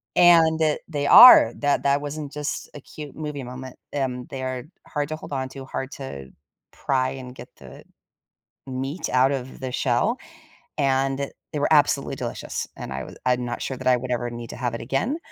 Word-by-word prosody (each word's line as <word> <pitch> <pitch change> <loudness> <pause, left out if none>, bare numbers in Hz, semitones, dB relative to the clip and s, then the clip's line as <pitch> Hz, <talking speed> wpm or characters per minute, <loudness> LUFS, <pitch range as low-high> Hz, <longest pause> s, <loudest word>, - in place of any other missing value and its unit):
And, 165 -2 +6 0.3
they 145 -3 -2
are, 190 - +10
that 145 -1 +1
that 140 +1 +3
wasn't 145 0 -5
just 150 0 -4
a - - -7
cute 150 -1 -10
movie 150 -3 -5
moment. 125 +1 -8 0.2
Um, 125 -3 -2
they 135 - -5
are 130 -1 -3 0.2
hard 145 -1 -3
to 155 - -3
hold 150 - -9
onto, 130 0 -5
hard 135 0 -5
to 70 - -8 0.4
pry 130 -1 0
and 125 -1 -9
get 120 -1 -11
the - - -13 0.8
meat 135 +5 -4
out 130 +2 +3
of 130 -1 -5
the 130 -1 -4
shell, 130 - 0 0.6
and 135 0 0 0.2
they - - -2
were - - +2
absolutely - - +3
delicious. - - -4
And 65 - -6
I 65 - -4
was - - -12
I'm 125 -1 +2
not 120 0 -4
sure 135 - -3
that 130 0 -5
I 125 - +5
would 125 +1 -5
ever 120 0 -1
need 120 -1 -7
to - - -8
have 120 -1 -2
it 115 - -6
again, 135 - -1
135 Hz, 190 wpm, -24 LUFS, 125-145 Hz, 0.8 s, are